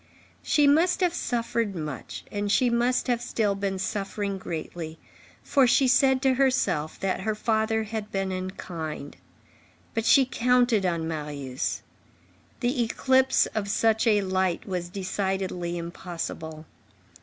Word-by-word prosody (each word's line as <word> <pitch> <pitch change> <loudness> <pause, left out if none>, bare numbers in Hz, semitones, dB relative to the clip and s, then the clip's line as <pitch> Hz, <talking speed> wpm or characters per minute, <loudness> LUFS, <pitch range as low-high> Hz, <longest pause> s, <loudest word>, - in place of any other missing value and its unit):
She 295 -2 +3
must 330 +7 +4
have 355 -2 +2
suffered 230 - -1
much, 150 -6 -6
and 205 0 -1
she 245 +2 +3
must 240 +2 +2
have 240 -2 0
still 220 -4 0
been 195 -1 -2
suffering 200 0 -3
greatly, 165 -1 -6 0.5
for 270 -3 +4
she 260 +2 +4
said 265 +1 +4
to 265 -1 +4
herself, 255 - +1
that 195 -1 0
her 215 +3 -1
father 220 0 +1
had 215 0 -5
been 195 -1 -1
unkind; 175 -5 -5 0.8
but 225 - -1
she 270 +3 +6
counted 245 -5 +2
on 165 -2 -1
Marius. 145 -5 -3 0.8
The 245 +1 +1
eclipse 260 +3 +3
of 205 -2 -2
such 220 +2 +2
a 210 -2 +4
light 185 -1 -1
was 180 -2 -3
decidedly 190 -2 -2
impossible. 170 -2 -6
205 Hz, 130 wpm, -26 LUFS, 175-240 Hz, 0.8 s, she